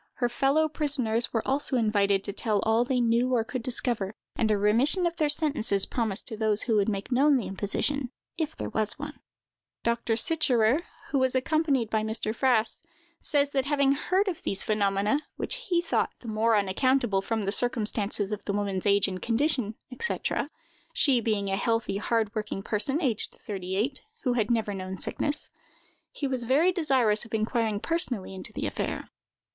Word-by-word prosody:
Her 245 -2 0
fellow 275 +5 +2
prisoners 270 -7 0
were 225 - -2
also 270 0 0
invited 200 -3 +2
to 200 - -1
tell 215 0 0
all 220 +2 +3
they 250 0 0
knew 240 +2 +2
or 230 - +2
could 250 +2 -5
discover; 235 -5 -2 0.2
and 220 - +1
a 210 - +3
remission 240 - +3
of 340 -1 0
their 305 -2 +1
sentences 285 - +2
promised 220 -4 -1
to 225 - -5
those 215 -1 +1
who 225 - +1
would 205 +1 +2
make 200 +3 -4
known 275 +3 +4
the 240 - -3
imposition, 240 +7 -1 0.3
if 315 -2 -3
there - - -5
was 215 +3 -1
one. 295 0 -7 0.6
Dr. 235 -1 0
Sicherer, 255 -1 +2 0.3
who 275 - +2
was 260 0 +1
accompanied 275 -4 +1
by 220 - +1
Mr. 220 0 -1
Frass, 240 -4 +1 0.4
says 285 -2 +1
that, 270 -2 0
having 280 -1 +2
heard 370 +8 +1
of 360 -4 -3
these 195 - 0
phenomena, 205 +4 +1 0.2
which - - -3
he 345 -1 +2
thought - - 0
the 240 - -10
more 220 +1 +2
unaccountable 210 +1 +1
from 220 +1 -2
the 195 - 0
circumstances 215 -3 0
of 210 - -4
the 200 - -2
woman's 200 -1 -1
age 200 0 +4
and 185 -1 -5
condition, 235 -2 +1 0.3
&c.—she 330 - -1
being 210 -3 -1
a - - +2
healthy, 225 -1 0
hard 220 0 0
working 210 -3 -4
person, 225 +8 0
aged 230 -6 +2
thirty 190 -2 -4
eight, 255 +7 -1 0.2
who 250 - +1
had 220 -3 0
never 225 -3 0
known 190 0 -5
sickness—he 290 +2 -6
was 260 -2 -2
very 295 +9 +4
desirous 265 - +2
of 225 -1 -5
inquiring 220 -1 0
personally 250 - 0
into 190 +2 -4
the - - -4
affair. - - -3
230 Hz, 175 wpm, -27 LUFS, 210-275 Hz, 0.6 s, known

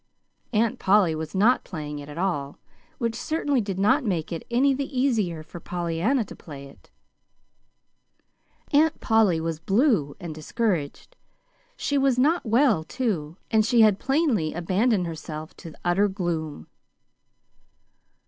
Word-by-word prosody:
Aunt 225 -1 +1
Polly 190 -4 +4
was 160 +2 -5
not 225 +7 +3
playing 150 -4 -6
it 145 0 -10
at 145 - -9
all 155 -7 -2 0.4
which 230 -3 -1
certainly 285 +1 -1
did 195 -3 -4
not 255 +10 +3
make 180 -9 -2
it 165 - -5
any 265 +4 +3
the 275 -1 -3
easier 210 - 0
for 170 - -10
Pollyanna 175 - -1
to - - -11
play 140 -3 -10
it. 140 - -17 1.8
Aunt 305 +2 +3
Polly 220 -7 +3
was 160 -1 -3
blue 195 - +2
and 170 -3 -6
discouraged. 170 - -3 0.6
She 285 -1 0
was 270 -2 +2
not 295 +2 +2
well, 230 - +3
too, 175 - -3
and 220 -1 +4
she 230 +1 +3
had 210 -3 +5
plainly 265 - +1
abandoned 190 +4 +1
herself 155 -1 -7
to 165 -2 -10
utter 185 +4 +3
gloom. 165 - -3
195 Hz, 140 wpm, -25 LUFS, 160-245 Hz, 1.8 s, had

